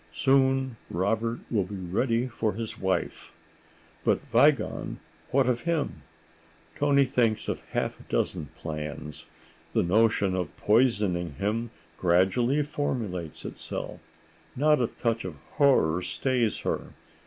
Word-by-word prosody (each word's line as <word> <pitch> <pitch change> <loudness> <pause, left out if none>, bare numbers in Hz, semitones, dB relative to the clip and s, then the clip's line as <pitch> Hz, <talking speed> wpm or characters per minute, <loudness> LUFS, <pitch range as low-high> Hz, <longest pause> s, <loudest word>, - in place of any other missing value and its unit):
Soon 130 -2 +2
Robert 115 +6 0
will 105 -5 +2
be 100 +2 -7
ready 115 +7 0
for 110 -3 -1
his 110 +2 -5
wife. 95 0 -2 0.7
But - - +3
Wiegand—what 135 0 +1
of 120 -1 +1
him? 165 -3 -1 0.7
Toni 140 -1 +4
thinks 120 -5 +1
of - - -2
half - - -1
a - - -13
dozen 80 -5 -1
plans. 75 -1 -6 0.5
The - - +3
notion 100 0 +3
of 90 -5 -3
poisoning 105 - +2
him 110 - -1 0.3
gradually 95 +11 +3
formulates 110 - -3
itself. - - -6 0.6
Not 150 +1 +4
a 120 - +2
touch 115 0 -2
of 90 -4 -5 0.2
horror 110 - +4
stays 120 +2 0
her. - - -3
115 Hz, 120 wpm, -27 LUFS, 95-130 Hz, 0.7 s, Toni